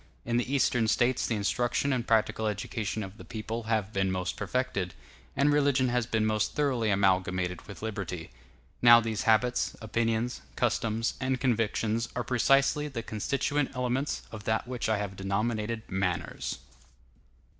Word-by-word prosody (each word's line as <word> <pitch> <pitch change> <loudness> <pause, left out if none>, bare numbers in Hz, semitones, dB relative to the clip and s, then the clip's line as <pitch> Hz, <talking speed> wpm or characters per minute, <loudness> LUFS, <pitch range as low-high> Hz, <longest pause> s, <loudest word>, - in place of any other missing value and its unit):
In 120 0 +1
the 125 +2 -1
Eastern 125 -4 +2
States 120 +3 +2
the 115 - 0
instruction 120 +6 0
and 120 -2 -2
practical 110 0 +2
education 105 +1 -3
of 95 +2 -9
the - - -10
people 115 0 -5
have 110 -2 0
been 95 -1 +1
most 90 0 -2
perfected, 100 - -2 0.4
and 145 +1 +3
religion 140 -3 +3
has 120 -2 0
been 110 -2 +1
most 110 -1 +1
thoroughly 130 -7 +1
amalgamated 95 -2 +1
with 100 +1 -10
liberty. 95 -6 -4 0.5
Now 120 -1 +9
these 110 -2 -2
habits, 120 +3 +2
opinions, 115 - -1
customs, 115 +1 0
and 130 0 0
convictions 115 -2 0
are 125 - -1
precisely 135 +4 +3
the 125 -6 -5
constituent 140 +6 -1
elements 125 +3 -1
of 110 -2 -8
that 110 +2 0
which 125 -3 -2
I 110 - +2
have 100 -2 -4
denominated 110 +3 -1
manners. 95 -2 -2
115 Hz, 150 wpm, -29 LUFS, 105-125 Hz, 0.5 s, Now